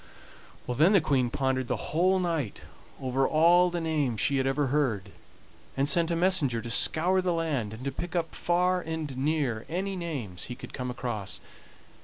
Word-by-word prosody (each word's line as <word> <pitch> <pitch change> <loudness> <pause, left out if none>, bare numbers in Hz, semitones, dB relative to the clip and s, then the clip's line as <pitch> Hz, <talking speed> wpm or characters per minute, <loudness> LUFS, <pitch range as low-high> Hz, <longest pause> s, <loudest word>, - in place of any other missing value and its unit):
Then 150 - +3
the 195 - +7
Queen 135 -5 +1
pondered 130 0 -1
the - - -4
whole 185 +4 +3
night 165 - -2 0.4
over 130 0 0
all 175 +3 +5
the 175 0 -3
names 150 -8 -1
she 140 - +1
had 135 0 +1
ever 135 +1 +1
heard, 110 -10 0 0.7
and 135 +1 +2
sent 165 +3 +3
a 170 - 0
messenger 165 -9 +2
to 115 +1 -6
scour 180 +9 +3
the 180 -1 0
land, 150 -10 -1
and 110 +3 -9
to 140 - -1
pick 175 +6 -6
up 165 -2 -1
far 180 +1 +1
and 160 -4 -5
near 135 -5 -1
any 190 +4 -2
names 140 - -5
he 125 - -6
could - - -11
come 125 -1 -4
across. 120 -5 -4
150 Hz, 180 wpm, -28 LUFS, 125-170 Hz, 0.7 s, the